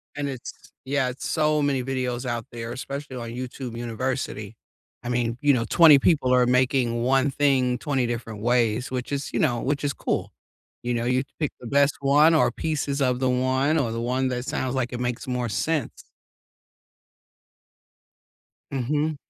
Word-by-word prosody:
And 145 Hz, -1 st, -2 dB
it's, 130 Hz, -3 st, -6 dB, 0.3 s
yeah, 135 Hz, -1 st, 0 dB
it's 125 Hz, -, -6 dB
so 155 Hz, -1 st, +2 dB
many 140 Hz, -3 st, +1 dB
videos 130 Hz, -1 st, -2 dB
out 120 Hz, -2 st, -3 dB
there, 115 Hz, -1 st, -6 dB
especially 135 Hz, +2 st, -6 dB
on 115 Hz, -1 st, -5 dB
YouTube 125 Hz, 0 st, -6 dB
University. 120 Hz, -2 st, -3 dB, 0.5 s
I 120 Hz, -, -4 dB
mean, 120 Hz, -1 st, 0 dB
you 145 Hz, -2 st, +4 dB
know, 115 Hz, -2 st, 0 dB
20 160 Hz, -5 st, +8 dB
people 135 Hz, -4 st, +3 dB
are 125 Hz, -1 st, +5 dB
making 125 Hz, -2 st, +2 dB
one 135 Hz, +2 st, +3 dB
thing 130 Hz, -3 st, +2 dB
20 130 Hz, -1 st, -1 dB
different 115 Hz, -3 st, -5 dB
ways, 120 Hz, +1 st, +1 dB
which 125 Hz, 0 st, -4 dB
is, 140 Hz, 0 st, -3 dB
you -, -, 0 dB
know, 120 Hz, -7 st, +2 dB
which 140 Hz, +2 st, -1 dB
is 145 Hz, -, +1 dB
cool. -, -, -2 dB, 0.5 s
You 120 Hz, 0 st, -1 dB
know, 120 Hz, 0 st, -1 dB
you 125 Hz, +2 st, +1 dB, 0.2 s
pick 150 Hz, -3 st, 0 dB
the 120 Hz, -, -9 dB
best 140 Hz, +3 st, +3 dB
one 145 Hz, +4 st, +5 dB
or 155 Hz, -, +3 dB
pieces 145 Hz, -3 st, -2 dB
of 125 Hz, -1 st, +1 dB
the 130 Hz, -1 st, +1 dB
one 130 Hz, +4 st, +1 dB
or, 130 Hz, -7 st, 0 dB
the 115 Hz, +1 st, -3 dB
one 130 Hz, +2 st, 0 dB
that 125 Hz, 0 st, -3 dB
sounds 130 Hz, 0 st, -2 dB
like 125 Hz, -2 st, -1 dB
it 120 Hz, -, -4 dB
makes 125 Hz, 0 st, -3 dB
more 125 Hz, -1 st, -1 dB
sense. 145 Hz, +6 st, -2 dB, 2.7 s
Mhm. 145 Hz, +4 st, -1 dB
130 Hz, 175 wpm, -25 LUFS, 120-140 Hz, 2.7 s, 20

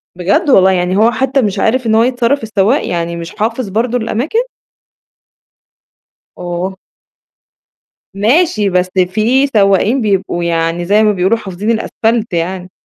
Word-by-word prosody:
بجد 200 Hz, -, 0 dB
والله! 190 Hz, -7 st, +5 dB
يعني 180 Hz, +1 st, 0 dB
هو 225 Hz, +3 st, +4 dB
حتى 265 Hz, +2 st, 0 dB
مش 205 Hz, -3 st, -2 dB
عارف 250 Hz, +4 st, 0 dB
إن 220 Hz, -1 st, +2 dB
هو 225 Hz, -, +4 dB
يتصرّف 245 Hz, +1 st, 0 dB
السواق، 220 Hz, +5 st, 0 dB
يعني 170 Hz, 0 st, -3 dB
مش 170 Hz, +2 st, -8 dB
حافظ 225 Hz, 0 st, -2 dB
برضه 230 Hz, +4 st, -1 dB
الأماكن؟ 245 Hz, -, -2 dB, 2.0 s
أوه! 180 Hz, +2 st, -4 dB, 1.4 s
ماشي 215 Hz, -, +1 dB
بس 180 Hz, 0 st, 0 dB, 0.2 s
في 240 Hz, +8 st, +1 dB
سواقين 210 Hz, +2 st, +2 dB
بيبقوا 190 Hz, -4 st, -1 dB
يعني 165 Hz, 0 st, -1 dB
زي 205 Hz, +4 st, +3 dB
ما 215 Hz, -, +3 dB
بيقولوا 190 Hz, +3 st, +1 dB
حافظين 200 Hz, +1 st, -4 dB
الأسفَلت 225 Hz, -1 st, -1 dB
يعني. 180 Hz, +2 st, -3 dB
210 Hz, 135 wpm, -14 LUFS, 185-235 Hz, 2.0 s, والله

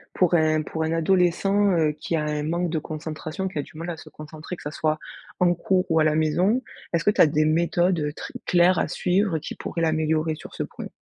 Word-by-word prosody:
pour 180 Hz, -2 st, +2 dB
un 155 Hz, -2 st, +3 dB
pour 160 Hz, +1 st, -3 dB
un 160 Hz, -, -1 dB
adolescent, 190 Hz, +4 st, +2 dB
heu, 155 Hz, -2 st, +3 dB
qui 155 Hz, +2 st, -3 dB
a 155 Hz, -, 0 dB
un 150 Hz, 0 st, -2 dB
manque 170 Hz, +3 st, -1 dB
de 160 Hz, -, 0 dB
concentration, 155 Hz, +3 st, -5 dB
qui 185 Hz, -5 st, -4 dB
a -, -, +1 dB
du 145 Hz, -, -14 dB
mal 165 Hz, +2 st, -5 dB
à 165 Hz, -, -7 dB
se -, -, -12 dB
concentrer, 155 Hz, +3 st, -9 dB
que -, -, -14 dB
ça 150 Hz, -, -4 dB
soit 155 Hz, 0 st, 0 dB, 0.4 s
en 175 Hz, -1 st, +4 dB
cours 180 Hz, +2 st, +1 dB
ou 160 Hz, -1 st, +3 dB
à -, -, +4 dB
la 155 Hz, -1 st, +2 dB
maison? 180 Hz, +10 st, +2 dB, 0.3 s
Est-ce 170 Hz, -1 st, +1 dB
que 205 Hz, -, +4 dB
tu -, -, +2 dB
as -, -, +8 dB
des 150 Hz, +1 st, +2 dB
méthodes, 170 Hz, +2 st, +2 dB
heu, 150 Hz, -1 st, -1 dB
très -, -, -8 dB
claires 175 Hz, 0 st, +4 dB
à -, -, +1 dB
suivre 180 Hz, +1 st, +1 dB
qui 155 Hz, -, -6 dB
pourraient 170 Hz, -, -4 dB
l'améliorer 160 Hz, 0 st, +1 dB
sur -, -, -12 dB
ce -, -, -2 dB
point? -, -, -8 dB
160 Hz, 245 wpm, -24 LUFS, 155-180 Hz, 0.4 s, as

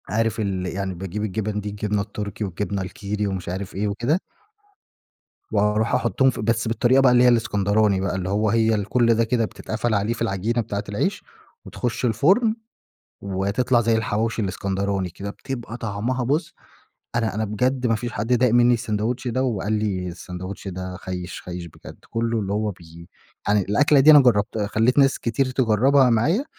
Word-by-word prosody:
عارف 115 Hz, 0 st, 0 dB
ال 95 Hz, -3 st, -2 dB
يعني 95 Hz, +1 st, -3 dB
باجيب 95 Hz, +3 st, -5 dB
الجِبَن 105 Hz, 0 st, -2 dB
دي 105 Hz, -, -5 dB
الجبنة 105 Hz, 0 st, -2 dB
التركي، 105 Hz, 0 st, -5 dB
والجبنة 100 Hz, +1 st, -3 dB
الكيري 105 Hz, +2 st, -3 dB
ومش 95 Hz, -3 st, -4 dB
عارف 95 Hz, +2 st, -5 dB
إيه 105 Hz, +2 st, -1 dB
وكده. 120 Hz, -, 0 dB, 1.3 s
وأروح 105 Hz, +1 st, +1 dB
أحُطُّهم 130 Hz, +3 st, +2 dB
في 125 Hz, -, -4 dB
بس 115 Hz, +2 st, 0 dB
بالطريقة 125 Hz, +3 st, +3 dB
بقى 130 Hz, -2 st, +5 dB
اللي 125 Hz, 0 st, +5 dB
هي -, -, +6 dB
الإسكندراني 105 Hz, -4 st, +2 dB
بقى، 95 Hz, -, -1 dB
اللي 95 Hz, -1 st, -3 dB
هو 105 Hz, +2 st, +1 dB
هي 110 Hz, 0 st, +3 dB
الكل 115 Hz, +3 st, +2 dB
ده 115 Hz, -, +2 dB
كده 115 Hz, 0 st, +1 dB
بتتقفل 110 Hz, +2 st, -3 dB
عليه 105 Hz, +2 st, +1 dB
في 120 Hz, -, -10 dB
العجينة 105 Hz, +5 st, 0 dB
بتاعة 105 Hz, -2 st, -4 dB
العيش 145 Hz, -, -1 dB, 0.4 s
وتخُش 120 Hz, 0 st, -3 dB
الفُرن، 190 Hz, -, +3 dB, 0.7 s
وتطلع 100 Hz, +6 st, +1 dB
زي 115 Hz, 0 st, +2 dB
الحواوشي 110 Hz, +1 st, -1 dB
الإسكندراني 100 Hz, -1 st, -2 dB
كده، 100 Hz, +4 st, -7 dB
بتبقى 120 Hz, +1 st, -6 dB
طعمها 115 Hz, +3 st, -2 dB
بُصّ 155 Hz, +7 st, -1 dB, 0.6 s
أنا 115 Hz, -2 st, 0 dB
أنا 110 Hz, +1 st, -1 dB
بجد 125 Hz, +5 st, 0 dB
ما 115 Hz, -, +2 dB
فيش 120 Hz, +2 st, -4 dB
حد 105 Hz, -, -3 dB
داق 125 Hz, 0 st, +4 dB
منّي 120 Hz, +1 st, +5 dB
الساندويتش 115 Hz, +2 st, -2 dB
ده 130 Hz, +2 st, 0 dB
وقال 110 Hz, -5 st, -1 dB
لي 100 Hz, -4 st, -1 dB
الساندويتش 90 Hz, +3 st, -7 dB
ده 95 Hz, 0 st, -6 dB
خيش 90 Hz, -1 st, -6 dB
خيش 90 Hz, -1 st, -6 dB
بجد، 85 Hz, -, -13 dB
كله 115 Hz, 0 st, -1 dB
اللي 100 Hz, -1 st, -3 dB
هو 105 Hz, +1 st, 0 dB
بي 85 Hz, -2 st, -13 dB, 0.4 s
أنا 105 Hz, 0 st, +4 dB
الأكلة 145 Hz, +9 st, +3 dB
دي 145 Hz, +3 st, +7 dB
أنا 150 Hz, -1 st, +9 dB
جرّبت 110 Hz, -4 st, +2 dB
خليت 110 Hz, +5 st, +1 dB
ناس 135 Hz, -1 st, +4 dB
كتير 130 Hz, +3 st, 0 dB
تجربها 130 Hz, +2 st, +3 dB
معايا 150 Hz, -, +2 dB
110 Hz, 175 wpm, -23 LUFS, 100-120 Hz, 1.3 s, أنا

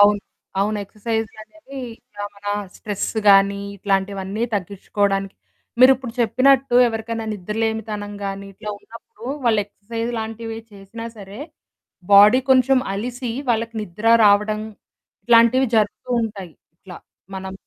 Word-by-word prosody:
అవును. 205 Hz, 0 st, +6 dB, 0.4 s
అవును. 210 Hz, +1 st, 0 dB
ఎక్సర్సైజ్‌లు 220 Hz, +2 st, -4 dB
అనేవి 275 Hz, 0 st, -11 dB, 0.4 s
ఆహ్, 205 Hz, -, -5 dB
మన 205 Hz, 0 st, -14 dB, 0.3 s
స్ట్రెస్ 205 Hz, -2 st, -3 dB, 0.2 s
గాని 200 Hz, 0 st, +5 dB, 0.2 s
ఇట్లాంటివన్నీ 195 Hz, +2 st, -2 dB
తగ్గించుకోవడానికి. 195 Hz, 0 st, -1 dB, 0.5 s
మీరిప్పుడు 255 Hz, -2 st, +5 dB
చెప్పినట్టు 255 Hz, +3 st, +3 dB
ఎవరికైనా 225 Hz, 0 st, -3 dB
నిద్రలేనితనం 210 Hz, +1 st, -3 dB
గానీ 195 Hz, 0 st, -5 dB
ఇట్లా 210 Hz, +2 st, -6 dB
ఉన్నప్పుడు 230 Hz, 0 st, -15 dB, 0.2 s
వాళ్ళు 220 Hz, -3 st, +3 dB
ఎక్సర్సైజ్ 230 Hz, +3 st, -5 dB
లాంటివే 225 Hz, 0 st, -5 dB
చేసినా 205 Hz, +3 st, -9 dB
సరే 200 Hz, 0 st, -10 dB, 0.7 s
బాడీ 205 Hz, +5 st, +8 dB
కొంచెం 260 Hz, 0 st, +5 dB, 0.2 s
అలిసి 245 Hz, +3 st, -4 dB, 0.2 s
వాళ్ళకి 230 Hz, 0 st, -1 dB
నిద్ర 210 Hz, +2 st, -7 dB, 0.2 s
రావడం 210 Hz, +1 st, +3 dB, 0.6 s
ఇట్లాంటివి 235 Hz, +3 st, +5 dB
జరుగుతూ 215 Hz, +4 st, 0 dB
ఉంటాయి. 195 Hz, -6 st, -6 dB, 0.2 s
ఇట్లా 180 Hz, 0 st, -12 dB, 0.4 s
మనం 190 Hz, 0 st, -6 dB
215 Hz, 110 wpm, -21 LUFS, 200-230 Hz, 0.7 s, బాడీ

